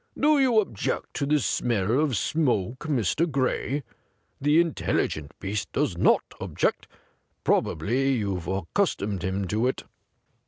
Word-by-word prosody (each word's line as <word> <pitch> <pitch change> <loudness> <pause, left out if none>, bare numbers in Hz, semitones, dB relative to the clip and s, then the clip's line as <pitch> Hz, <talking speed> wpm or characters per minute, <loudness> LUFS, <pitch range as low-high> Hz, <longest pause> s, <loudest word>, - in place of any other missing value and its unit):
Do 300 -1 +4
you 250 -5 +4
object 145 - -2
to 140 - -1
the 150 +1 +3
smell 115 -1 +1
of 145 -7 +1
smoke, 125 - 0
Mr. 150 - +1
Gray? 135 +1 -1 0.6
The 150 +3 +4
intelligent 105 - 0
beast 100 +1 -3
does - - 0
not - - +4 0.2
object. - - -1 0.6
Probably 125 - +1
you've 100 -7 -2
accustomed 100 - -1
him 95 +1 -1
to 110 +4 +1
it.' 130 - -2
125 Hz, 125 wpm, -26 LUFS, 100-150 Hz, 0.6 s, Do